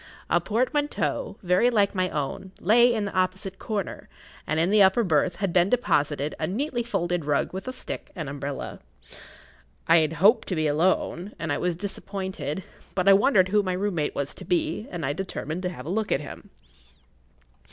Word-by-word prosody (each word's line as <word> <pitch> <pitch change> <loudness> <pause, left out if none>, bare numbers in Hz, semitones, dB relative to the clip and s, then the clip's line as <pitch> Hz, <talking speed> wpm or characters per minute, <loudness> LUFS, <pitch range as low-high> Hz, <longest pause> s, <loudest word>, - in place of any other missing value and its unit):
A - - +4
portmanteau, 260 +7 -1
very 180 +7 +4
like 205 -4 +2
my 185 -2 0
own, 150 +6 -4
lay 235 +6 +5
in 220 -3 0
the 200 - -5
opposite 185 +1 -1
corner, 205 -4 -4 0.4
and 155 +1 0
in 170 +4 +2
the 210 -1 +5
upper 190 +5 +5
berth 170 -1 +2
had 195 -2 -2
been 180 +1 +4
deposited 150 - +1
a 155 - -1
neatly 240 +5 -1
folded 175 -7 -1
rug 145 +3 0
with 190 +6 -6
a - - -2
stick 255 - -7
and 160 -6 -4
umbrella. 140 0 -5 1.1
I 165 - +7
had 160 -1 +2
hoped 200 +9 +4
to 185 - -1
be 155 -1 0
alone, 175 +5 0
and 165 -3 -2
I - - -1
was 180 -1 0
disappointed; 190 -4 -4 0.3
but 185 0 0
I 195 - +9
wondered 195 -3 +4
who 210 +2 +3
my 185 -2 -2
room 200 +2 -1
mate 155 -3 -1
was 140 0 -2
to - - -11
be, 315 - -1
and 170 -5 -4
I 145 - 0
determined 175 -1 -4
to 180 - -1
have 140 -7 -9
a - - -5
look 215 +3 -1
at - - +3
him. 150 - -10
185 Hz, 195 wpm, -26 LUFS, 160-205 Hz, 1.1 s, I